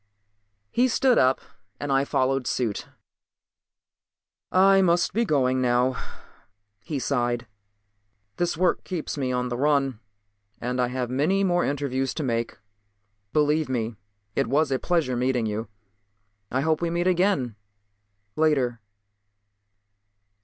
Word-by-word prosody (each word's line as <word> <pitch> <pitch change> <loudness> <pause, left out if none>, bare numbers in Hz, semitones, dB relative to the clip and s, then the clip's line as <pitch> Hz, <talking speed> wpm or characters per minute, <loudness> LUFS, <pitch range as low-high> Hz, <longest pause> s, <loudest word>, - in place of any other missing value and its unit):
He 250 +2 +3
stood 255 0 +3
up 130 +1 +3 0.4
and 145 -1 -3
I 135 0 +3
followed 130 -1 0
suit. 115 -5 -2 1.6
"I 195 +1 +5
must 175 -1 +2
be 230 +3 +1
going 130 - +2
now," 125 +1 +2 0.9
he 150 - -3
sighed. 120 -3 -1 0.9
"This 175 -2 0
work 180 +1 +1
keeps 175 -5 -4
me 135 -3 -1
on 125 0 -1
the 120 - -3
run 140 -4 +1 0.6
and 125 +1 -1
I 125 - +2
have 125 -1 -3
many 160 +10 +2
more 175 -2 +2
interviews 135 -2 -1
to 155 - -2
make. 115 -3 -2 0.7
Believe 150 0 +2
me, 115 -3 -2 0.4
it 135 - +1
was 145 +3 +2
a 130 - +1
pleasure 165 -8 0
meeting 125 -1 +1
you. 110 +1 -3 0.8
I 130 - 0
hope 160 +2 +1
we 170 - 0
meet 170 +1 -1
again 180 - +1 0.8
later." 135 -7 +1
135 Hz, 125 wpm, -25 LUFS, 125-165 Hz, 1.6 s, I